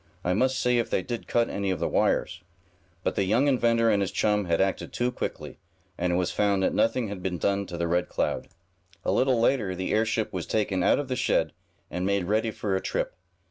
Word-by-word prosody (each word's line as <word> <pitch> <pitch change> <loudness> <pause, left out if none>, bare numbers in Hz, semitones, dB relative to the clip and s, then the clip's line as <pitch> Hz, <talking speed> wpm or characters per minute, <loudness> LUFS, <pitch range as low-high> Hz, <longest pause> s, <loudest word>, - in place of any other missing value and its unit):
"I 90 - +1
must 130 +6 +2
see 125 -1 +2
if 115 - -1
they 95 - 0
did 120 -2 -5
cut 120 0 +2
any 100 -1 -2
of 95 - 0
the - - 0
wires." 85 - +1 0.6
But - - 0
the 100 - 0
young 110 +9 +2
inventor 115 -4 +3
and 100 -1 +2
his 95 - 0
chum 105 -2 +1
had 85 -1 +1
acted 95 0 0
too 125 +1 0
quickly, - - -5 0.4
and 90 0 -1
it - - +1
was 90 0 0
found 100 -2 +1
that - - +1
nothing 115 0 +1
had 100 -2 -6
been 90 -1 -2
done 100 +4 0
to 85 -1 -6
the 85 0 -1
Red 90 +1 0
Cloud. - - -1 0.6
A - - +2
little 130 -2 +2
later 115 -6 +1
the 95 +1 -3
airship 110 0 0
was 90 -3 -4
taken 100 -4 0
out - - +4
of 145 - -3
the 130 - -2
shed, - - +1 0.4
and 90 - -3
made 100 0 +1
ready 110 +5 +1
for 105 -2 -2
a 95 - -1
trip. - - -2
100 Hz, 230 wpm, -27 LUFS, 95-115 Hz, 0.6 s, out